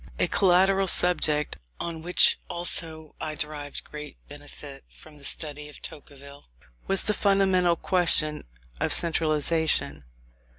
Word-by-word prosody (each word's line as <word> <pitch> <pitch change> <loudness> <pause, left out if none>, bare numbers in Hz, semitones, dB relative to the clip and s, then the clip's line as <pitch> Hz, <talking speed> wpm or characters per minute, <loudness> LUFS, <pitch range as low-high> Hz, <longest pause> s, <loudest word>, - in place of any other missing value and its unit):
A - - +1
collateral 190 +1 +3
subject 155 -5 +3 0.2
on 165 -2 -5
which 175 +2 +2
also 160 -3 -1
I 155 -1 -4
derived 150 -2 -5
great 150 -1 -10
benefit 145 -1 -12
from 150 -2 -17
the - - -16
study 150 0 -5
of 150 - -13
Tocqueville, 140 -1 -12 0.4
was 195 -1 +1
the 210 - 0
fundamental 190 -4 +2
question 165 -4 +1 0.3
of - - +1
centralization. 155 - 0
155 Hz, 120 wpm, -26 LUFS, 150-180 Hz, 0.4 s, collateral